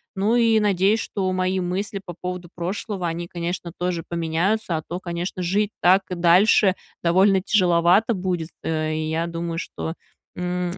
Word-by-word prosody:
Ну 205 +5 +2
и 230 -2 +4
надеюсь, 205 +1 +2
что 190 -4 -2
мои 185 0 0
мысли 190 +3 -3
по 175 - -6
поводу 180 -1 -5
прошлого, 185 +1 -3
они, 170 +1 -4
конечно, 170 0 -4
тоже 175 -2 -2
поменяются. 170 +3 0
А - - -3
то, 175 +1 -4
конечно, 175 +1 -4
жить 200 +4 0
так 190 +2 +5
и - - -1
дальше 185 +3 +5 0.3
довольно 190 +3 +4
тяжеловато 180 +2 +3
будет, 180 -4 -2
э, 155 -1 -1
и 155 0 -2
я 165 +1 0
думаю, 170 0 -4
что, 165 -1 -5 0.4
м, 180 0 -2
180 Hz, 160 wpm, -23 LUFS, 170-195 Hz, 0.4 s, так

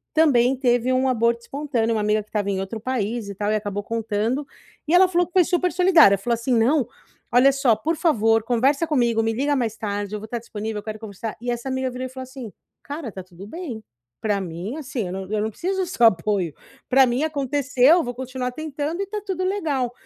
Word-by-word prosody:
também 265 -5 +4
teve 245 -1 +2
um 260 +1 +2
aborto 235 -1 +1
espontâneo, 240 -4 -1
uma 215 - 0
amiga 210 +1 +1
que 210 - -32
estava 205 -2 -2
em 195 -1 -1
outro 195 +4 -5
país 230 -2 -2
e - - -5
tal 205 +2 -1
e - - +2
acabou 205 -1 -3
contando. 225 +5 -1 0.4
E 315 - +1
ela 370 +1 +7
falou 355 -1 +2
que 350 - -28
foi 370 - +6
super 360 +1 +1
solidária, 340 - +6
falou 235 +4 0
assim: 235 +3 -1
"Não, 245 +3 +3 0.4
olha 250 +3 +6
só 270 -4 +3
por 325 +9 -1
favor 225 -9 +3
conversa 260 +7 +2
comigo, 235 -6 +2
me 225 0 0
liga 285 +5 0
mais 230 -5 -1
tarde, 205 -1 -3
eu - - -4
vou 215 - -8
estar 235 +2 -4
disponível, 220 -1 -5
eu - - -10
quero 215 0 -6
conversar". 220 0 -6
E 245 - -4
essa 240 +2 -4
amiga 260 0 -1
virou 255 +1 -5
e - - -11
falou 260 0 -7
assim: 260 -4 -9 0.3
"Cara, 285 -3 -6
está 190 -2 -8
tudo 185 +2 -12
bem. 260 - -7 0.4
Para 205 -2 0
mim 180 - -5
assim, 260 -8 -4
eu - - -5
não 190 0 -6
eu 215 -1 0
não 215 - -1
preciso 380 - -2
do - - 0
seu 245 -9 +2
apoio, 190 -4 +2 0.4
para 265 0 +6
mim 250 +3 0
aconteceu, 285 +1 +3
vou 245 0 -5
continuar 255 0 -4
tentando 310 +4 -4
e - - +1
está 420 +2 -4
tudo 375 -2 -2
legal". 300 -11 -1
245 Hz, 225 wpm, -23 LUFS, 215-285 Hz, 0.4 s, ela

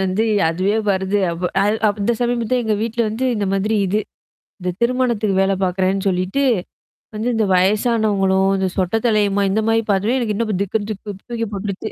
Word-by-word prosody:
வந்து 190 +4 0 0.2
அதுவே 185 +6 0
வருது. 190 +1 0
அப்ப 175 +1 -2
அ - - +2 0.2
அப்ப 205 - -1
அந்த 235 +4 +2
சமயம் 240 -1 0
தான் 255 -1 +2
எங்க 215 -1 +1
வீட்ல 230 +1 -2
வந்து 225 +5 -3
இந்த 205 -2 -1
மாதிரி 210 +3 0
இது. 205 +3 +1 0.6
இந்த 180 0 -2
திருமணத்துக்கு 235 -4 +1
வேல 195 0 +2
பாார்க்குறேன்னு 190 +1 0
சொல்லிட்டு. 185 +8 0 0.7
வந்து 220 +3 -2
இந்த 220 -2 +2
வயசானவங்களும், 195 -1 +2
இந்த 190 0 0
சொட்ட 185 +3 0
தலையமோ 205 -3 +2
இந்த 215 +3 +1
மாரி 225 0 +3
பார்த்தவே 210 +7 +1
எனக்கு 215 -4 -1
இன்னும் 215 -1 -1
திக்கு 205 +2 -1
தூக்கி 215 +3 -5
போ 210 - -9
போட்டுருச்சு. 200 +2 -4
205 Hz, 175 wpm, -19 LUFS, 190-225 Hz, 0.7 s, மாரி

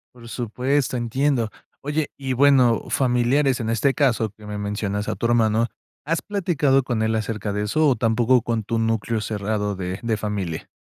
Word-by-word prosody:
Por 115 -1 -12
supuesto, 125 +4 -1
entiendo. 120 0 0 0.3
Oye, 150 +1 -2
y 135 -2 -2
bueno, 130 -3 +4
familiares 130 +1 +2
en 115 -1 -2
este 135 +4 +1
caso 120 -6 +2
que 105 +1 -16
me 105 0 -5
mencionas 105 0 -3
a - - -1
tu - - -4
hermano, 115 -1 +3 0.4
¿has 165 +3 0
platicado 155 -9 +1
con 120 -3 -1
él 110 0 +1
acerca 110 -1 -2
de 105 +1 -1
eso 155 +9 +2
o 135 - +4
tampoco 115 +2 +2
con 115 -2 -1
tu 115 +2 -2
núcleo 115 0 0
cerrado 105 -1 -2
de 95 0 -4
de 115 -1 0
familia? 100 -6 -4
115 Hz, 175 wpm, -23 LUFS, 110-135 Hz, 0.4 s, bueno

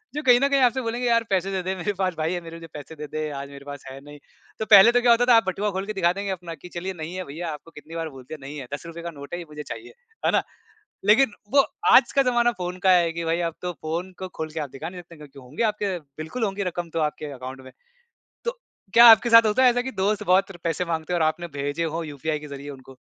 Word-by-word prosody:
जो 300 - -1
कहीं 245 -1 +6
न 275 - +3
कहीं 275 -1 +3
आपसे 255 +1 +3
बोलेंगे, 240 +1 -2
"यार, 230 -1 +3
पैसे 195 0 0
दे 190 - -1
दे, 190 +1 -2
मेरे 190 +3 -2
पास 185 -1 0
भाई 160 +2 -1
है 175 - -2
मेरे 165 0 -10
जो 165 - -10
पैसे 150 +2 -9
दे 150 0 -7
दे, 155 0 -3
आज 140 -1 -6
मेरे 140 0 -12
पास 145 -1 -8
है 135 +1 -9
नहीं।" 145 0 -12 0.4
तो 220 - -1
पहले 205 +2 +9
तो 245 0 +3
क्या 240 -1 +5
होता 235 +1 +4
था, 240 - +8
आप 225 - +5
बटुआ 200 +2 -1
खोल 190 +1 -3
के 215 - -4
दिखा 175 -3 +2
देंगे 200 0 -3
अपना 170 -3 -6
कि, 180 +5 -13
"चलिए, 180 +2 -5
नहीं 160 0 -7
है 185 - -3
भईया, 165 +3 -6
आपको 155 +2 -10
कितनी 150 +2 -12
बार 165 -1 -3
बोल 130 - -11
दिया, 155 +5 -8
नहीं 140 +2 -8
है। 125 - -8
₹10 165 +3 -7
का 170 0 -5
नोट 140 +4 -10
है, 175 - -3
ये 170 - -7
मुझे 150 0 -7
चाहिए" 360 - -9 0.3
है - - +4
ना। - - +2 0.6
लेकिन 220 +3 +5 0.2
वो 275 -1 +6 0.3
आज - - +6
का 275 - +4
ज़माना 240 -1 +3
फ़ोन 180 +1 -4
का - - +7
है 175 -2 +4
कि 170 0 -4
भई, 165 +1 0
अब 165 -2 -2
तो 180 0 -3
फ़ोन 170 +4 -3
को 185 - -4
खोल 160 0 -3
के 160 - -5
आप 145 - -4
दिखा 155 +6 -7
नहीं 180 -1 -9
सकते 170 -2 -16
क्योंकि 145 -2 -13
होंगे 130 - -4
आपके 200 -3 -2 0.2
बिल्कुल 160 +10 -4
होंगी 200 -1 -1
रकम 175 -1 -5
तो 165 - -1
आपके 150 -1 -8
अकाउंट 130 0 -8
में। 130 - -13 0.7
तो 480 +1 -3 0.3
क्या 235 +1 +9
आपके 225 +2 +5
साथ 230 0 +8
होता 215 +5 +3
है 255 - +8
ऐसा 245 +1 0
कि 265 - -5
दोस्त 210 0 0
बहुत 195 +1 +3
र 180 - -12
पैसे 170 +2 -1
माँगते 165 0 -3
और 175 - +1
आपने 175 +2 -8
भेजे 145 +4 -2
हों 165 +1 -2
यूपीआई 150 +1 -3
के 150 - -10
ज़रिए 140 0 -8
उनको? 130 0 -15
175 Hz, 285 wpm, -24 LUFS, 155-205 Hz, 0.7 s, पहले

